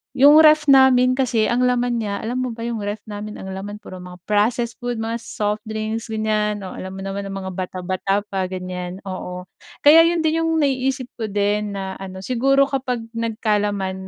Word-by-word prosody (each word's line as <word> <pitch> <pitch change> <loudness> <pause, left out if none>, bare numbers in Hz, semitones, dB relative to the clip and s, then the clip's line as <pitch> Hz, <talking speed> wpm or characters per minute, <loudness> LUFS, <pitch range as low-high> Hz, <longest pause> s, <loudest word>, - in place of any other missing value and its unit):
'yong 285 +3 +8
ref 310 -1 +6
namin 260 -2 +6
kasi 255 -4 +1
ang 250 +1 +2
laman 245 -1 +1
niya 205 -2 -3
alam 245 +3 -2
mo 250 -2 -3
ba 230 - -7
'yong 235 -1 -3
ref 205 +1 -4
namin 210 0 -7
ang 190 - -7
laman 195 +2 -6
puro 185 - -9
mga 180 0 -10
processed 225 +3 0
food, 245 -1 -3
mga 225 +1 -3
soft 210 -2 -2
drinks, 220 +1 -3
ganyan. 215 -2 -1
Oh, 185 - -6
alam 190 0 -7
mo 195 - -7
naman 195 +1 -4
ang 195 - -6
mga 190 -1 -5
bata-bata 185 +2 -2
pa, 190 -1 -1
ganyan, 180 0 -6
oo. 180 -1 -6 0.4
Kaya 325 +3 +8
'yon 335 -1 0
din 320 +1 +1
'yong 325 0 +1
naiisip 265 -1 -1
ko 220 - -2
din 205 0 -1
na 190 -1 -5
ano. 190 0 -8
Siguro 270 +4 +3
kapag 255 -3 -2
nagkalaman 210 -4 -1
215 Hz, 190 wpm, -21 LUFS, 195-250 Hz, 0.4 s, yong